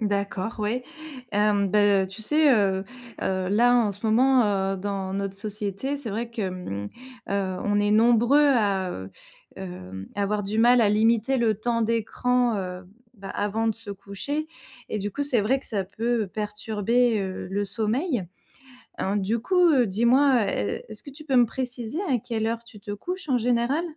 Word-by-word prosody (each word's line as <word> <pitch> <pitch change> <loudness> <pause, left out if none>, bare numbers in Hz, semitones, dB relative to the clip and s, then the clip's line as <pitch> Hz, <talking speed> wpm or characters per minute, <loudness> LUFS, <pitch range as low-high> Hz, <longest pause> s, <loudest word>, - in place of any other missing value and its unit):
D'accord, 200 +1 -2
ouais, 230 +4 -1 0.5
hem, 205 -1 +2
bah, 205 -2 +4
heu, - - -5
tu 195 +4 -10
sais, 300 +4 +4
heu 195 -3 +1 0.4
heu, 185 -1 -1
là, 240 +5 +4
en 230 -4 +3
ce 200 +3 -6
moment, 255 +3 +4 0.3
heu, - - -5
dans 195 -1 -3
notre 195 0 -3
société, 210 +6 -4
c'est 255 -7 -6
vrai 230 +3 -3
que, 220 -5 -2
mmh, 100 - -5 0.4
heu, 195 -2 -1
on 205 0 +2
est 205 0 +1
nombreux 240 +6 +5
à, 200 -8 +2
heu, 95 +1 -7 0.5
hem, 95 +1 -8
à 205 - -1
avoir 205 +1 -1
du 210 +3 -2
mal 245 +1 +6
à 215 - +4
limiter 225 +4 +2
le 225 -4 +2
temps 230 +1 0
d'écran, 230 +1 +1
heu, 180 -1 -5 0.3
bah, 195 -3 -9
avant 210 +2 -1
de 225 - +1
se 225 -2 -10
coucher 200 +10 -4 0.4
et 215 - -3
du 205 +1 -3
coup, 285 +8 -3
c'est 250 -5 +1
vrai 240 +7 +2
que 270 - -18
ça 205 -4 -1
peut 225 +3 -2
perturber, 215 +3 0
heu, 190 -1 -5
le 200 +1 -1
sommeil, 230 - -1 0.8
hein, 195 +2 0
du 205 +4 0
coup, 360 +11 +1
heu, 265 -6 +4
dis-moi, 235 +3 +3
heu, - - -3
est 105 - -2
est-ce 215 -1 -10
que - - -9
tu 300 +3 -13
peux 270 -3 0
me 245 -1 +6
préciser 245 +2 -5
à 265 -10 +1
quelle 220 0 -2
heure 230 +1 -2
tu 225 -2 -14
te 205 - -7
couches 355 - -5
en 255 - +2
général? 245 +6 +1
215 Hz, 190 wpm, -25 LUFS, 200-245 Hz, 0.8 s, mal